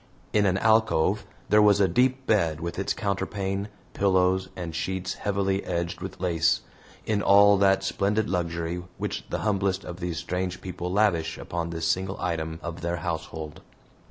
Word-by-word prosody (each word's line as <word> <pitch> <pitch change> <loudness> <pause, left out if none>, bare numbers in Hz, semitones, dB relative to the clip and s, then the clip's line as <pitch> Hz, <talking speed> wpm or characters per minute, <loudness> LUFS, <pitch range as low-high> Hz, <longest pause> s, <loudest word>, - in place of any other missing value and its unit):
In 105 -1 +4
an 95 0 +2
alcove 105 -3 +2 0.2
there 105 +1 +6
was 105 -1 +5
a 100 - +5
deep 130 +8 +2
bed 85 -9 +2
with 85 0 -4
its - - -1
counterpane, 100 0 -2 0.3
pillows, 95 -1 +2
and 85 -2 -5
sheets 95 +2 -2
heavily 100 -1 -1
edged 85 -1 -3
with - - -7
lace, 85 -2 +2 0.4
in 105 -2 0
all 100 +1 +7
that 95 -1 +4
splendid 100 +2 0
luxury 85 -1 -2 0.2
which - - -3
the - - -2
humblest 100 -2 0
of 90 0 -8
these 90 -2 -3
strange 90 +2 -3
people 90 -1 -5
lavish 85 -6 +1
upon 85 -1 -4
this 80 -1 -2
single 95 +3 -1
item 80 -2 -2
of 85 +1 -6
their 85 +1 -1
household. 80 -2 -5
95 Hz, 160 wpm, -26 LUFS, 85-100 Hz, 0.4 s, all